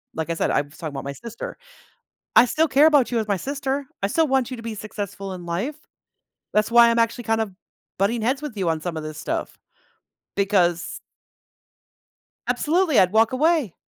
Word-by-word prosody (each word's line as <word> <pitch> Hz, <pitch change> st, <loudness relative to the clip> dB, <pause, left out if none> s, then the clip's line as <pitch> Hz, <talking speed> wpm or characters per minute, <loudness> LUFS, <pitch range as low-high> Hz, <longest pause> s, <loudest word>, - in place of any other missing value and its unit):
like 160 Hz, 0 st, -3 dB
I -, -, +1 dB
said, 165 Hz, -, 0 dB
I -, -, +3 dB
was 145 Hz, +1 st, -13 dB
talking 160 Hz, -4 st, -5 dB
about 135 Hz, -, -5 dB
my 140 Hz, -, -5 dB
sister. 235 Hz, +8 st, -8 dB, 0.8 s
"I -, -, +9 dB
still 315 Hz, +6 st, +1 dB
care 280 Hz, +2 st, +5 dB
about 290 Hz, -6 st, +4 dB
you 240 Hz, -, 0 dB
as 220 Hz, -, -1 dB
my 200 Hz, -, +2 dB
sister. 275 Hz, -, -3 dB, 0.2 s
I -, -, +3 dB
still 315 Hz, +10 st, +1 dB
want 265 Hz, -1 st, +1 dB
you 255 Hz, -, -4 dB
to 230 Hz, -, -9 dB
be 230 Hz, -1 st, -5 dB
successful 200 Hz, -2 st, -6 dB
in 180 Hz, -1 st, -8 dB
life. 190 Hz, -, -2 dB, 0.8 s
That's 215 Hz, +1 st, +2 dB
why 235 Hz, 0 st, +7 dB
I'm 230 Hz, -, +1 dB
actually 230 Hz, +1 st, +1 dB
kind 225 Hz, 0 st, +1 dB
of 205 Hz, -4 st, -5 dB, 0.5 s
butting 220 Hz, +4 st, +1 dB
heads 260 Hz, +5 st, +1 dB
with 290 Hz, -7 st, -6 dB
you 190 Hz, -4 st, 0 dB
on 160 Hz, -1 st, -1 dB
some 175 Hz, -1 st, -4 dB
of 155 Hz, -, -4 dB
this 155 Hz, 0 st, -7 dB
stuff, 160 Hz, -, -4 dB, 0.8 s
because" 185 Hz, -4 st, +1 dB, 1.5 s
Absolutely, 305 Hz, +5 st, +2 dB
I'd 185 Hz, 0 st, +5 dB
walk 225 Hz, +2 st, +4 dB
away. 295 Hz, -, +2 dB
225 Hz, 200 wpm, -23 LUFS, 185-265 Hz, 1.5 s, I